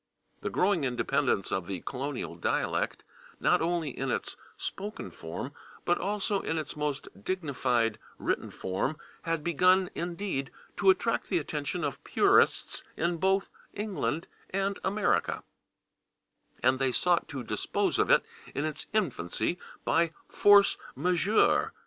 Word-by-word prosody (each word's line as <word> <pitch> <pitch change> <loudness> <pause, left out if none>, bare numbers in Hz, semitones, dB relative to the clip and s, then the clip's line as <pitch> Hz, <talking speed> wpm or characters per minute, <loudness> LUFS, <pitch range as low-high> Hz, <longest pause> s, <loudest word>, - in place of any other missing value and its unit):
The - - -2
growing 185 -4 +2
independence 120 -6 +1
of 95 -3 -1
the 95 -3 -4
colonial 135 -6 -4
dialect, 85 - -1 0.4
not - - +3
only 165 -3 0
in 135 +2 -3
its - - -2 0.2
spoken 200 - -5
form, 85 - -6 0.3
but 175 - +2
also 205 0 0
in 160 - -2
its 155 -2 -4
most 150 -1 -2 0.2
dignified 125 - 0 0.2
written - - -1
form, 95 +11 -2 0.2
had 165 -2 -1
begun, 185 +3 +4
indeed, 175 -5 -3 0.3
to - - +4
attract 380 - +2
the - - +2
attention - - -2
of - - -3
purists 405 +3 +3 0.2
in 170 0 +1
both 190 +3 +1 0.2
England 200 -6 -2 0.2
and 195 +1 -1
America, 205 +2 +1 1.2
and 130 0 +4
they 135 -1 +2
sought 175 +6 +2
to 140 -5 -5
dispose - - 0
of - - +3
it - - +5 0.3
in 145 - 0
its 155 -1 -4
infancy 150 - 0 0.3
by 170 0 +3 0.2
/force 205 -1 +6 0.2
majeure 180 +8 +3
165 Hz, 130 wpm, -29 LUFS, 135-190 Hz, 1.2 s, force